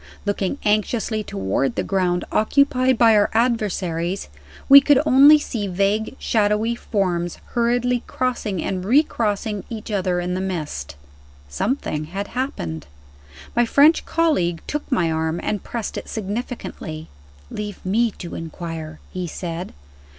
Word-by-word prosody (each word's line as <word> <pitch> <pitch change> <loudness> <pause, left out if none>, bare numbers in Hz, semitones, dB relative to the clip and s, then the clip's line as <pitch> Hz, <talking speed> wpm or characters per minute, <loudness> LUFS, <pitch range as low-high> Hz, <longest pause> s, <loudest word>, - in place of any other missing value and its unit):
Looking 205 +3 -1
anxiously 215 +1 0
toward 100 - -1
the - - -1
ground 180 -2 0
occupied 255 +2 +3
by 225 -1 +6
our 205 -1 +4
adversaries, 195 - 0 0.4
we 280 +1 +10
could 280 -1 +4
only 285 +2 +8
see 230 -8 -3
vague, 200 +6 0
shadowy 215 +1 +1
forms 180 -7 -2
hurriedly 245 +1 +1
crossing 230 -8 -2
and 185 -1 -2
recrossing 215 -4 +1
each 220 -1 -6
other 185 -3 0
in 180 0 -2
the 185 - -2
mist. 150 - -4 0.5
Something 155 - -2
had 195 +5 -5
happened! 85 - -4 0.7
My 240 0 +3
French 295 +6 +5
colleague 185 - +1
took 295 0 -4
my 175 -10 +2
arm 160 +1 -1
and 210 - -2
pressed 235 -3 -5
it - - -12
significantly. 205 -7 -5 0.4
"Leave 210 -1 -5
me 225 +5 +2
to 170 - -7
inquire," 165 -1 -6
he 180 -1 -3
said. 170 +1 -5
205 Hz, 130 wpm, -22 LUFS, 175-240 Hz, 0.7 s, we